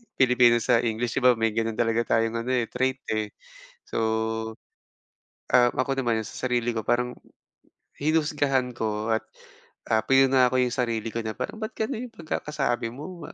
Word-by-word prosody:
Pilipino 125 -2 +5
sa 115 - +3
English, 115 +1 -1
'di - - -8
ba 125 -1 +6
may 110 0 +1
gano'n 115 0 -1
talaga 115 0 +1
tayong 115 0 +1
ano, 120 +2 -3
eh, 125 -3 +1
trait 130 +1 0
eh. 110 -1 -2 0.5
So, - - -3 1.6
ah, 120 -1 +6
ako 135 +1 -1
naman, 115 -2 +1
sa - - -11
sarili 120 -1 0
ko 110 - -2
parang 125 +2 0 0.9
hinusgahan 145 -4 +1
ko 110 0 -1
at, 110 - +1 0.7
ah, 110 - +4
pinuna 135 0 +5
ko - - +2
'yung 125 -1 +1
sarili 115 -3 -1
ko 115 - -2
na 110 -1 -5
parang, 220 - -5
"Ba't 220 - -5
gano'n 245 +2 -3
'yung - - -26
pagkakasabi 150 -7 -2
mo,, 165 +6 -8
125 Hz, 165 wpm, -26 LUFS, 115-135 Hz, 1.6 s, ba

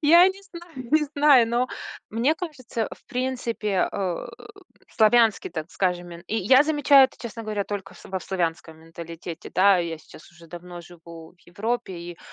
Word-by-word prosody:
Я 340 +5 +7
не 390 +1 -7
знаю 345 -5 -13 0.2
не 310 -1 +4
знаю, 280 -6 +6
но 240 +2 +1 0.4
мне 240 +8 +1
кажется, 255 - -5
в - - -12
принципе, 240 -6 -1
а, 185 -4 -3
э, - - -13 0.4
славянский, 225 0 +3
так 160 +1 -6
скажем, 180 -2 -1
мен 170 0 -10
и 220 - -2
я 255 +7 +5
замечаю 290 -2 +5
это, 260 - -4
честно 230 -1 -7
говоря, 210 -2 -3
только 195 -1 -6
во 190 - -4
в - - -13
славянском 165 -3 -3
менталитете. 165 +1 -9
Да, 190 0 +5
я 165 -2 -3
сейчас 155 - -16
уже 170 -1 -16
давно 175 +1 -9
живу 170 -1 -13
в - - -32
Европе, 215 +3 -3
и 170 0 -8
205 Hz, 175 wpm, -24 LUFS, 175-255 Hz, 0.4 s, Я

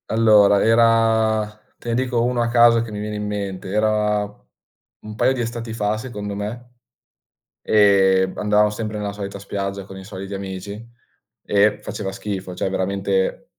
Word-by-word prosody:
Allora, 105 -3 +5
era 115 -1 +3 0.3
te 120 - -8
ne 115 - 0
dico 125 -1 0
uno 125 0 0
a 120 - 0
caso 120 -1 +5
che 115 -1 -6
mi 105 - -5
viene 105 0 -4
in 105 0 -4
mente. 100 -2 -4
Era 105 0 +1 0.8
un 105 0 -9
paio 130 - +3
di 130 - -4
estati 115 -1 -4
fa, 105 -1 -1
secondo 105 -4 -6
me, 120 +4 -7 0.9
e 95 -3 +4
andavamo 105 0 +3
sempre 105 0 -4
nella 105 -1 -3
solita 100 -1 -6
spiaggia, 100 0 -4
con 95 0 -11
i 95 - -10
soliti 100 0 -7
amici 100 +3 -7 0.6
e 105 +1 +2
faceva 100 -2 -5
schifo, 95 -3 -5
cioè, 95 - -2
veramente 95 0 -1
105 Hz, 160 wpm, -21 LUFS, 100-115 Hz, 0.9 s, Allora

